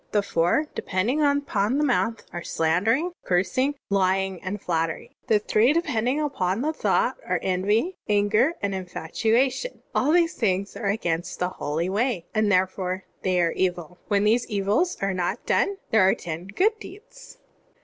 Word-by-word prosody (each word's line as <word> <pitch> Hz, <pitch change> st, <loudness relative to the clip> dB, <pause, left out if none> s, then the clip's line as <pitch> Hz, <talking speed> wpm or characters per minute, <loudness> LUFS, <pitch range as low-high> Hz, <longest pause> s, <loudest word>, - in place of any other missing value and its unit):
The 205 Hz, -1 st, +3 dB
four 175 Hz, -, +1 dB
depending 220 Hz, +11 st, -1 dB
upon 280 Hz, -6 st, +1 dB
the 295 Hz, -, +2 dB
mouth 230 Hz, -4 st, 0 dB
are: 175 Hz, -, -4 dB
slan* 165 Hz, +3 st, 0 dB
dering, 285 Hz, +11 st, +2 dB
cursing, 195 Hz, +11 st, +1 dB, 0.2 s
lying, 190 Hz, -1 st, +1 dB
and 200 Hz, +2 st, -4 dB
flattery. 165 Hz, -3 st, -2 dB
The 215 Hz, -, +4 dB
three 215 Hz, +5 st, +3 dB
depending 255 Hz, -4 st, 0 dB
upon 235 Hz, -8 st, -1 dB
thought -, -, +1 dB
are: -, -, -1 dB
envy, 205 Hz, -, 0 dB
anger, 210 Hz, +9 st, +3 dB
and 200 Hz, -1 st, 0 dB
infatuation. 220 Hz, -, -1 dB
All 280 Hz, +4 st, +2 dB
these 340 Hz, -1 st, +3 dB
things 200 Hz, -2 st, -1 dB
are -, -, -3 dB
against 175 Hz, -5 st, -2 dB
the 180 Hz, -, -1 dB
Holy 160 Hz, 0 st, -3 dB
Way, 205 Hz, -2 st, -1 dB
and 215 Hz, -2 st, +2 dB
therefore 185 Hz, 0 st, 0 dB, 0.2 s
they 185 Hz, -1 st, +1 dB
are 170 Hz, -1 st, +2 dB
evil. 180 Hz, -2 st, -2 dB
"When 205 Hz, -1 st, +2 dB
these 225 Hz, +3 st, +2 dB
evils 210 Hz, -, 0 dB
are 195 Hz, 0 st, +1 dB
not 180 Hz, -1 st, -2 dB
done, 400 Hz, -, +1 dB
there 220 Hz, -, +5 dB
are 190 Hz, +1 st, +4 dB
ten 170 Hz, +2 st, -6 dB
good 420 Hz, -, +1 dB
deeds." 450 Hz, +5 st, -13 dB
205 Hz, 160 wpm, -25 LUFS, 185-255 Hz, 0.2 s, there